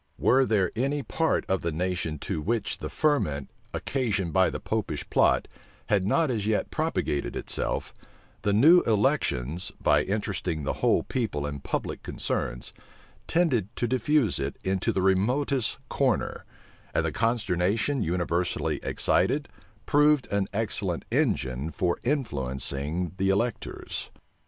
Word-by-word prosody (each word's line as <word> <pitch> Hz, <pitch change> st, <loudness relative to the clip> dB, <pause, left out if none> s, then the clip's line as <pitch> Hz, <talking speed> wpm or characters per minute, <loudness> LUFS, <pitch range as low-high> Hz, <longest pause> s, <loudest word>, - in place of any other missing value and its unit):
Were 130 Hz, 0 st, +4 dB
there 100 Hz, -5 st, +2 dB
any 140 Hz, +4 st, 0 dB
part 160 Hz, +4 st, 0 dB
of 95 Hz, -2 st, 0 dB
the 85 Hz, -, -1 dB
nation 90 Hz, -1 st, -2 dB
to 75 Hz, -, -3 dB
which 110 Hz, +4 st, -1 dB
the -, -, -4 dB
ferment, 80 Hz, -, 0 dB, 0.2 s
occasioned 105 Hz, -, -1 dB
by 95 Hz, -1 st, +4 dB
the -, -, -4 dB
Popish 105 Hz, -9 st, -2 dB
plot, -, -, +3 dB, 0.4 s
had 100 Hz, -3 st, +2 dB
not 155 Hz, +6 st, +2 dB
as 105 Hz, -4 st, -1 dB
yet 110 Hz, -1 st, 0 dB
propagated 70 Hz, -, -1 dB
itself, -, -, -2 dB, 0.5 s
the 100 Hz, -, +1 dB
new 155 Hz, -, +7 dB
elections, 100 Hz, -, +1 dB
by -, -, +4 dB
interesting 95 Hz, -6 st, -2 dB
the -, -, -1 dB
whole -, -, +3 dB
people 105 Hz, -, -2 dB
in 70 Hz, -1 st, -4 dB
public -, -, -3 dB
concerns, -, -, -3 dB, 0.5 s
tended 140 Hz, -, +2 dB
to 120 Hz, -, 0 dB
diffuse 130 Hz, -, +2 dB
it -, -, -3 dB
into 95 Hz, 0 st, 0 dB
the 95 Hz, -, 0 dB
remotest 120 Hz, +7 st, +1 dB
corner; 130 Hz, -6 st, 0 dB, 0.5 s
and -, -, +2 dB
the -, -, 0 dB
consternation 115 Hz, +2 st, +1 dB
universally 85 Hz, -1 st, 0 dB
excited -, -, +1 dB, 0.4 s
proved 150 Hz, -1 st, +4 dB
an 100 Hz, -1 st, +1 dB
excellent 100 Hz, -4 st, -2 dB
engine 65 Hz, +4 st, 0 dB
for 85 Hz, +2 st, 0 dB
influencing 75 Hz, -, -1 dB
the 95 Hz, 0 st, +1 dB
electors. 115 Hz, +5 st, -2 dB
100 Hz, 130 wpm, -27 LUFS, 85-125 Hz, 0.5 s, new